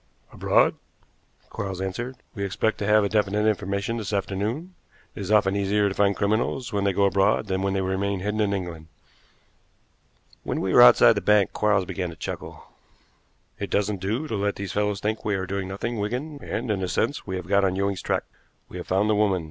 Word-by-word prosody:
"Abroad," - - +2 0.7
Quarles 95 -2 -4
answered. 115 +7 -4 0.2
"We 100 - -4
expect 100 +3 -1
to 100 - -2
have 105 -1 +4
definite 105 0 +1
information 100 +2 -1
this 110 -3 -4
afternoon. 105 - -2 0.4
It - - -10
is 100 - -5
often 105 -2 +3
easier 100 +1 +2
to - - -4
find 100 0 +2
criminals 110 +4 -1
when 100 -1 0
they 100 - +3
go 100 +2 +1
abroad 100 +1 +2
than 95 0 -2
when 95 0 0
they 95 - +1
remain 95 +1 -1
hidden 105 +2 -2
in 105 -1 +1
England." 85 -5 -4 1.5
When - - -3
we 95 - -1
were - - +8
outside 120 -1 +8
the 105 - -2
bank 105 -2 +3
Quarles 105 -3 +2
began 90 0 -3
to 85 - -9
chuckle. 70 - -7 1.0
"It - - -4
doesn't 100 -1 0
do 110 +11 -2
to 110 - -3
let 100 0 -1
these 100 -2 -5
fellows 105 -1 0
think 110 +1 -2
we 105 -2 0
are 95 -1 -2
doing 95 0 -3
nothing, 105 +4 -4
Wigan; 130 +8 -3
and, 115 - -3
in 100 -2 -1
a 95 - -1
sense, 140 +8 -1
we 95 - -3
have 90 -2 -5
got 100 +2 +2
on 95 -1 +1
Ewing's 100 0 -1
track. - - -1 0.5
We - - -8
have 90 - -7
found 95 +3 +2
the 110 - +3
woman. 105 -3 +2
100 Hz, 205 wpm, -25 LUFS, 95-105 Hz, 1.5 s, were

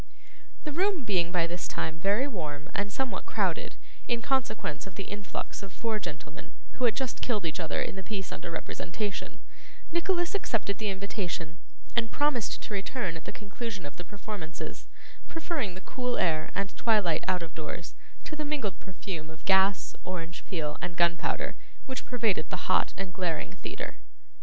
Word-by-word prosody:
The 300 - -2
room 360 -2 +3
being 175 -5 +3
by 175 -2 +4
this 175 +1 -2
time 160 +1 -1
very 205 +9 +4
warm 150 - -3
and 200 0 +1
somewhat 265 +4 -1
crowded, - - +1 0.3
in 240 -1 +3
consequence 220 - +1
of 190 - -9
the 195 - -2
influx 205 +1 -4
of 195 -1 -7
four 225 +1 0
gentlemen, 150 -3 -6 0.2
who 255 - +1
had 225 - +5
just 265 -2 -1
killed 215 -7 +2
each 165 +3 0
other 160 -3 +1
in - - -3
the 190 - -3
piece 195 -2 -3
under - - -4
representation, 185 +4 -2 0.5
Nicholas 350 +1 +3
accepted 225 - +1
the 215 -1 +1
invitation, 185 -4 -2 0.4
and 230 -1 +4
promised 290 -6 +2
to 215 - -4
return 195 -2 0
at 165 - -7
the - - -3
conclusion 205 -2 -4
of 145 - -6
the 175 - -4
performances; 195 -3 -5 0.4
preferring 300 - -1
the 185 - -7
cool 250 +3 0
air 155 -3 +3
and 200 -1 0
twilight 210 -9 +4
out 180 -2 +3
of 160 - -7
doors 165 +2 -4 0.3
to 310 - -4
the 305 - -1
mingled 275 - 0
perfume 180 -4 -5
of 160 0 -11
gas, 190 0 +5
orange 175 -2 -3
peel, 155 -6 -1
and 175 - -3
gunpowder, 170 0 +3 0.3
which 260 -1 -3
pervaded 225 -10 +2
the - - -3
hot - - +5
and 190 -2 -3
glaring 175 -3 0
theatre. - - -4
195 Hz, 170 wpm, -31 LUFS, 170-235 Hz, 0.5 s, had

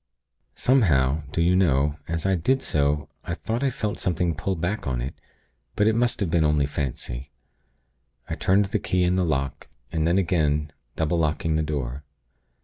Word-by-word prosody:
Somehow, 80 - +3
do 85 - +1
you 90 +2 +3
know, 75 -5 +2
as 85 +1 -2
I 95 - +3
did 130 +10 +1
so, 75 0 0 0.2
I - - -3
thought 115 +3 -3
I 140 - +2
felt 105 -4 -3
something 90 -2 0
pull 95 +5 -2
back 90 +2 -2
on 65 -2 -1
it; 65 +3 -4 0.6
but 105 - +3
it 110 - +4
must 120 +1 +1
have 90 -5 0
been 85 -1 +3
only 75 -2 +3
fancy. 70 -2 -4 1.0
I - - -3
turned 100 +2 +3
the 105 +2 -1
key 90 -1 +1
in 90 +1 +2
the 95 - +2
lock, 70 -5 -2 0.2
and 80 0 0
then 85 +2 +3
again, 75 -5 +1 0.2
double 80 +2 0
locking 80 0 0
the 80 - +2
door. 70 -3 -3
80 Hz, 180 wpm, -25 LUFS, 75-95 Hz, 1.0 s, it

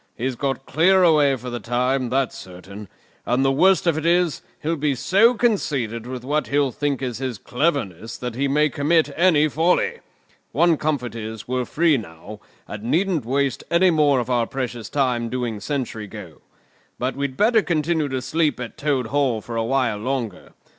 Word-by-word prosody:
He's 130 +2 -2
got 135 +1 -3
clear 185 +4 +4
away 150 -5 +4
for 125 0 -7
the 120 - -4
time, 125 +2 0
that's 135 0 0
certain; 95 +3 -10 0.4
and 125 +3 +1
the 135 - +3
worst 185 +6 +3
of 165 -3 +2
it - - -7
is, 175 -2 +2 0.2
he'll 165 +2 0
be 145 -2 0
so 205 - +4
conceited 135 - -1
with 125 -1 -6
what 150 +3 0
he'll 140 -1 +1
think 140 0 -2
is 125 -2 -3
his 130 -4 -3
cleverness 120 - -2
that 125 -1 -5
he 135 +4 -1
may 150 +2 +3
commit 150 +2 +1
any 160 -3 +4
folly. 180 - +1 0.5
One 170 -1 +4
comfort 145 -5 -2
is, 110 -1 -7
we're 125 0 -1
free 160 0 +2
now, 100 0 -9 0.3
and 105 - -7
needn't 165 - 0
waste 135 +2 -1
any 175 +2 +4
more 145 -4 +3
of 120 - -3
our 120 -2 +1
precious 125 -4 -5
time 125 -4 0
doing 120 -3 -3
sentry 120 -5 -4
go. - - -11 0.6
But 130 +2 -2
we'd 140 -1 -3
better 220 +1 +4
continue 160 -3 0
to 130 -1 -3
sleep 155 0 0
at 120 -2 -7
Toad 140 -4 0
Hall 135 -2 0
for 115 +2 -8
a 115 - 0
while 125 -2 0
longer. 120 -5 -4
135 Hz, 180 wpm, -22 LUFS, 120-155 Hz, 0.6 s, clear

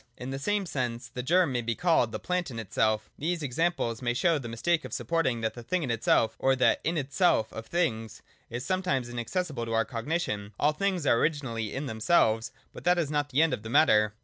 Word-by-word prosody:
In 125 +2 -6
the 135 - -4
same 205 +7 0
sense, 125 -5 -3
the 125 +1 -5
germ 170 +4 +3
may 125 -1 0
be 115 0 -2
called 165 -10 +2
the - - -3
plant 180 -2 -2
in 120 - -7
itself 110 0 0
These 165 +2 -1
examples 140 -4 -1
may 120 -1 0
show 165 +3 +2
the 125 - -7
mistake 160 +8 0
of - - -8
supposing 145 -9 0
that 110 0 -1
the 120 - -9
'thing 165 +9 -1
in 130 - -1
itself 115 -1 +2
or 135 0 +3
the 130 -1 +3
'in 165 +1 0
itself 145 - +1
of 110 0 -7
things 115 -11 -2 0.3
is 120 +2 -5
something 185 -9 0
inaccessible 120 +2 -3
to 115 - -3
our 115 0 +2
cognition. 115 -4 -3
All 150 - +4
things 185 0 -1
are 120 -4 +4
originally 120 -9 -1
in 140 +2 -4
themselves, 110 -1 +2 0.2
but - - -10
that 180 +1 +3
is 160 -4 -1
not 145 -1 0
the 145 +5 +3
end 165 - +1
of - - -3
the 110 - -8
matter. 105 -6 +4
130 Hz, 225 wpm, -28 LUFS, 115-165 Hz, 0.3 s, All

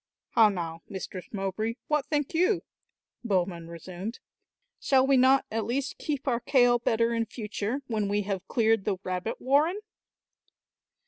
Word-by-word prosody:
"How 220 -2 +6
now, 165 -4 -4
Mistress 185 -2 -6
Mowbray, 210 +3 -2
what 300 -3 +1
think 295 -1 -1
you?" 365 +3 +2 0.6
Bowman 180 -6 -1
resumed. 180 +6 -7 0.6
"Shall 265 -1 +3
we 275 0 +4
not 260 +1 +5
at 225 0 -1
least 270 +4 -2
keep 285 -3 -3
our 240 -3 +2
kail 245 -2 +4
better 230 0 +1
in 230 -1 0
future, 225 +3 -4
when 220 -5 -1
we 205 +1 0
have 195 -2 -4
cleared 225 -3 +2
the 200 -3 0
rabbit 185 +4 -3
warren?" 300 +9 +2
225 Hz, 145 wpm, -28 LUFS, 195-265 Hz, 0.6 s, How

